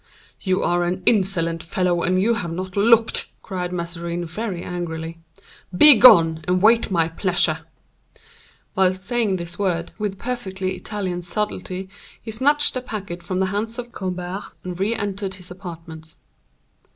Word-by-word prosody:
"You 185 -1 0
are 175 0 +1
an 180 +1 -2
insolent 180 -6 +2
fellow, 175 0 0
and 185 +2 +1
you 225 +5 +3
have 180 -8 -3
not 185 +2 -5
looked," 225 +2 +4 0.2
cried 180 -3 -4
Mazarin, 170 0 -4
very 180 +1 -4
angrily; 165 -2 -5 0.6
"begone 175 - +8
and 180 0 +2
wait 225 +4 +4
my 170 -4 +2
pleasure." 165 -2 +1 1.2
Whilst 185 0 +1
saying 230 -4 0
these 175 0 -7
words, 175 -4 -1
with 205 -2 -3
perfectly 190 -7 -4
Italian 185 -3 -4
subtlety 185 0 -4 0.3
he 225 - -8
snatched 290 +6 +2
the 255 - -3
packet 200 -7 -6
from 185 +2 -2
the - - +3
hands 225 +3 -2
of 240 -1 -6
Colbert, 185 -1 -4 0.2
and 180 -1 -6
re 210 +4 +1
entered 200 -2 -3
his 180 -1 -10
apartments. 165 -3 -10
185 Hz, 145 wpm, -22 LUFS, 175-210 Hz, 1.2 s, begone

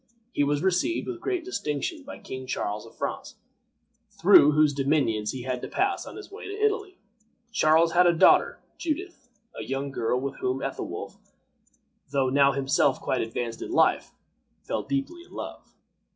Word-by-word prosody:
He 145 - +1
was 145 +2 0
received 190 - +1
with 360 -2 -5
great 365 -4 -2
distinction 305 - -3
by 285 +1 -9
King 130 - -8
Charles 105 -3 -3
of - - -18
France, - - -4 0.7
through 150 +1 +6
whose 150 -1 +4
dominions 135 -7 +1
he 130 -2 -6
had 125 -1 -3
to - - -5
pass 390 0 -1
on - - -9
his 415 -1 -10
way 410 - -9
to 405 - -5
Italy. 415 -3 0 0.5
Charles 165 -4 +4
had 175 +1 +5
a - - +6
daughter, 165 - +5 0.2
Judith, 325 -5 -4 0.3
a - - -6
young 135 +1 -3
girl 125 -1 0
with 135 +1 -4
whom 130 +1 -2
Ethelwolf, - - -5 0.9
though 135 -2 +1
now 140 +1 +4
himself 135 0 +1
quite 130 - -1
advanced 115 0 -4
in - - -5
life, 360 - +2 0.5
fell - - -2
deeply 280 +5 -3
in - - -19
love. - - -8
150 Hz, 165 wpm, -26 LUFS, -, 0.9 s, through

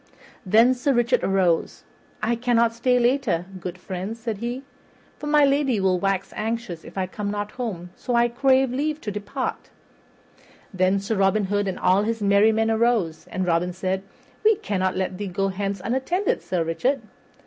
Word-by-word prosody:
Then 230 +6 +6
Sir 255 +2 0
Richard 240 +1 +2
arose. 185 -4 +1 0.4
"I 235 +2 +2
cannot 235 -1 +2
stay 250 +2 +2
later, 240 -8 +1
good 180 0 -6
friends," 190 +5 -5
said 225 -3 -4
he, 240 +3 -4 0.6
"for 295 - -5
my 295 -1 +5
lady 275 -5 +2
will 190 -2 +2
wax 195 0 -1
anxious 220 -6 -3
if - - -12
I 190 - +1
come 200 +2 -5
not 205 0 -3
home; 190 -8 -5
so 245 - -2
I 235 0 +4
crave 260 +1 +2
leave 300 +4 -1
to 210 - -4
depart." 205 0 -4 1.0
Then 185 +1 +2
Robin 195 0 +2
Hood 205 +1 0
and 190 - -2
all 185 +2 +3
his 225 +2 -1
merry 200 +1 +4
men 225 0 +1
arose, 220 -8 +1
and 185 0 -2
Robin 175 +1 +1
said, 190 +1 -2 0.4
"We 440 0 +5
cannot 190 - -1
let 190 0 -2
thee 205 - -3
go 195 +2 -1
hence 195 0 -3
unattended, 300 - 0
Sir 175 -3 -1
Richard." 245 +12 -1
210 Hz, 170 wpm, -24 LUFS, 190-245 Hz, 1.0 s, Then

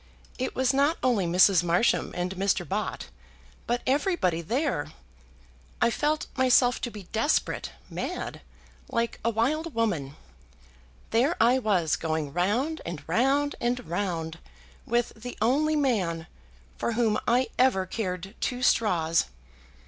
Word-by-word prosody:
It 260 - -2
was 260 0 +2
not 285 +4 +2
only 230 -8 +2
Mrs. 180 +1 +5
Marsham 175 +6 +2
and 180 +1 -2
Mr. 190 -2 0
Bott, 205 +2 -3 0.6
but 240 +1 -1
everybody 265 - +1
there. 245 - -1 0.9
I 235 - +3
felt 300 +5 0
myself 255 -1 +4
to 240 - -2
be 210 -3 -9
desperate, 225 +7 0 0.2
mad, - - -5 0.5
like 230 0 -1
a 230 - +2
wild 285 +8 -1
woman. 170 -12 -1 1.0
There 260 +9 +3
I 245 +3 +5
was, 185 -9 +1
going 155 -3 -2
round 235 - 0
and 170 -3 -6
round 270 - +2
and 245 +1 -1
round 170 -2 -3 0.5
with 240 +1 0
the 245 +3 -8
only 290 +8 +2
man 195 - 0 0.5
for 235 - -1
whom 225 -2 +2
I 250 +2 +3
ever 250 -8 +3
cared 185 -1 -4
two 250 0 -2
straws. 170 -9 +2
230 Hz, 130 wpm, -27 LUFS, 180-260 Hz, 1.0 s, Mrs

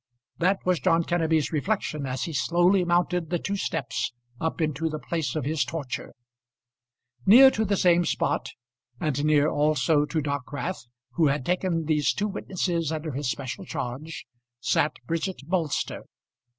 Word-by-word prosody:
That 185 +3 +3
was 180 -2 +2
John 165 0 +3
Kenneby's 160 -3 +1
reflection 155 -3 -1
as 130 0 -3
he 165 - -4
slowly 175 +6 +3
mounted 175 -1 +1
the 175 - +1
two 200 +4 -3
steps 160 -12 -2 0.3
up 160 +1 -2
into 155 0 0
the 155 - -3
place 155 -4 -3
of 150 -4 -2
his 155 +1 +1
torture. 150 -6 -5 1.1
Near 260 +6 +9
to 220 - 0
the 200 -1 +1
same 175 -1 +4
spot, - - 0 0.5
and 145 -2 -1
near 150 -1 +4
also 150 -1 +2
to 160 +2 -2
Dockwrath 145 +2 -4 0.2
who 160 +2 +2
had 140 -2 0
taken 180 -2 0
these 150 -2 +2
two 210 - -1
witnesses 175 -5 -2
under 155 0 -3
his 140 0 -2
special 130 0 -4
charge, 135 +6 -5 0.3
sat 150 +4 +1
Bridget 165 +2 -2
Bolster. 165 -3 -1
160 Hz, 150 wpm, -26 LUFS, 145-175 Hz, 1.1 s, Near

